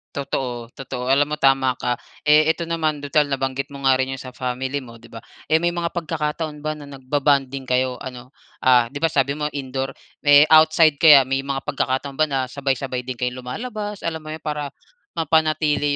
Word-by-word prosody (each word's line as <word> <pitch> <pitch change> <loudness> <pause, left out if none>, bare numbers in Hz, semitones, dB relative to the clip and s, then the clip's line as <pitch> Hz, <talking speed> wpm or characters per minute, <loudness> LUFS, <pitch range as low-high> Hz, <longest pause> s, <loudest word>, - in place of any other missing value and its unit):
Totoo, 125 -4 -3
totoo 125 -2 -6
alam 135 +2 +4
mo 150 - -3
tama 135 -1 +3
ka. 125 0 0 0.3
Eh 155 +1 +6
eto 170 0 -5
naman 155 -3 -1
tutal 145 0 +1
nabanggit 135 +1 -2
mo 140 - -9
nga 130 - +6
rin 130 0 -1
yung 135 - -5
sa 125 0 -10
family 130 +2 -3
mo 115 -1 -13
'di 115 - -16
ba, 115 0 -11 0.2
eh 155 - +3
may 175 +2 +2
mga 170 -1 -2
pagkakataon 155 -2 -3
ba 155 +1 -3
na 150 - -11
nagba-bonding 140 0 -1
kayo 130 0 0
ano, 125 -1 -9 0.3
ah 125 -2 +4
'di 145 - -6
ba 165 - +2
sabi 140 -1 0
mo 150 - 0
indoor. 135 0 -4 0.2
Eh 145 0 +7
outside 155 -1 +5
kaya? 150 -4 +8
May 135 +1 -1
mga 135 -1 -2
pagkakataon 140 -1 -2
ba 155 - +4
na 135 -2 -1
sabay-sabay 135 -2 -3
din 130 - -4
kayong 125 +1 -3
lumalabas, 210 - -6
alam 165 -1 -2
mo 155 0 -7
yun, 160 - -14
para 150 -2 -3 0.5
mapanatili 155 -2 +1
140 Hz, 195 wpm, -21 LUFS, 130-155 Hz, 0.5 s, kaya